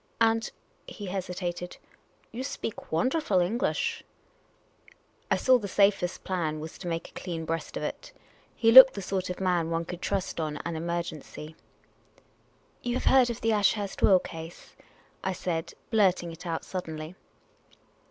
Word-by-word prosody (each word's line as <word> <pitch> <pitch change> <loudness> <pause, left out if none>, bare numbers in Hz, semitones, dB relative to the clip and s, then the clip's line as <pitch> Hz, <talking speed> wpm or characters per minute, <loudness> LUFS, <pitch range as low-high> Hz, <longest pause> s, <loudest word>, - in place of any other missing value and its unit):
And 225 0 +3 0.2
" - - -38
he 205 - -8
hesitated, 180 -2 -4 0.3
" - - -37
you 245 +3 -5
speak 265 -5 -4
w^onderful 190 - +1
Eng 225 +7 -2
lish! 460 - -1 0.7
" - - -30
I - - +4
saw 255 -1 +4
the 205 - -5
safest 195 -2 +2
plan 160 -5 -2
was 160 +1 -8
to 180 - -7
make 165 0 -3
a - - -24
clean 165 -3 -5
breast 165 +1 -3
of - - -4
it. - - -5 0.4
He 225 -2 +4
looked 260 +2 +11
the 200 - -5
sort 185 0 -2
of 180 - -4
man 180 -3 +1
one 165 0 -1
could 175 +1 -7
trust 195 -3 -2
on 155 -2 -2
an 170 - -3
emergency. 160 -2 -5 0.6
" - - -37
You 245 0 -2
have - - -2
heard 260 -2 +5
of 235 - -5
the 225 0 +2
Ashurst 205 -1 +1
will 190 - +7
case? 165 -1 -9 0.2
" - - -33
I 190 - 0
said, 170 -2 -3 0.2
blurt 195 -6 +3
ing 170 - -6
it 165 +2 -9
out 165 -1 -3
suddenly. 160 -3 -5
180 Hz, 175 wpm, -28 LUFS, 165-210 Hz, 0.7 s, looked